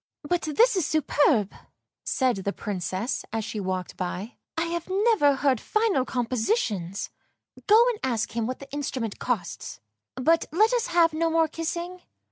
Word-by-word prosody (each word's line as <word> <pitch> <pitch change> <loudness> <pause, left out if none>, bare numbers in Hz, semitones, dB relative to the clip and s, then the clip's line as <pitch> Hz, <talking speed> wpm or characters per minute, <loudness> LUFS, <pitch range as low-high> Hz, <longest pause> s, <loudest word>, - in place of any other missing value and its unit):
" - - -66
But 350 - +2
this 440 +10 +3
is 365 -6 +1
superbe! 280 -8 +2 0.3
" - - -63
said 255 -5 +2
the 195 +1 -2
Princess, 195 +3 -3
as 225 -1 -2
she 220 - -4
walked 185 -2 -3
by. 185 +5 -4
" - - -62
I 325 - +2
have 340 +1 -4
never 390 -7 +3
heard 265 -4 +1
finer 430 - +1
compositions. 230 - -1 0.6
Go 445 +3 +7
and 460 -4 -3
ask 235 -4 -1
him 230 -1 0
what 255 - -3
the 275 0 -12
instrument 265 -6 -3
costs, 220 -9 -3 0.4
but 320 +6 +2
let 430 +9 +3
us 485 -3 +1
have 340 -2 +3
no 330 +1 +1
more 325 0 +3
kissing." 340 +3 -4
280 Hz, 170 wpm, -26 LUFS, 225-340 Hz, 0.6 s, Go